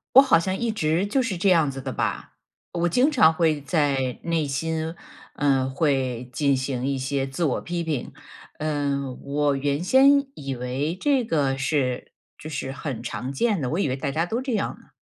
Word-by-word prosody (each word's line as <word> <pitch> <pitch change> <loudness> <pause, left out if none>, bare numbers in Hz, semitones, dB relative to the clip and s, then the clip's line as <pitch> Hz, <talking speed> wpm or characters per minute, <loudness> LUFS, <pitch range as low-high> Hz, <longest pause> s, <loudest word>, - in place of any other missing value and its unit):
我 270 - +11
好 260 -11 +5
像 185 +3 -1
一 235 +2 -1
直 165 -3 +1
就 265 +6 +2
是 230 -7 -1
这 185 +3 +1
样 165 -5 +4
子 135 -1 -5
的 130 -1 -4
吧？ - - -3 0.4
我 175 0 +1
经 250 - +3
常 165 - +5
会 160 -3 +2
在 140 -4 0
内 165 -3 0
心， 160 +3 -2 0.4
嗯， 135 -2 +2
会 130 -4 -1
进 140 0 +2
行 130 -1 -2
一 140 0 0
些 135 +1 -1
自 135 +6 -5
我 140 - +1
批 175 0 -3
评， 155 -6 -3 0.5
嗯。 140 -3 -2
我 145 0 0
原 140 +2 -1
先 275 +7 +5
以 135 -1 -4
为 130 +7 -2
这 275 -4 +2
个 140 -9 0
是 135 -2 -1 0.3
就 155 - -8
是 140 -3 -4
很 135 -2 -5
常 125 +5 -4
见 205 - +1
的， 130 - -1
我 165 - -1
以 175 - +1
为 130 - -1
大 135 0 -3
家 160 +4 +1
都 225 +7 -2
这 260 -1 -3
样 210 -3 -1
呢。 - - -22
150 Hz, 210 characters per minute, -24 LUFS, 135-170 Hz, 0.5 s, 我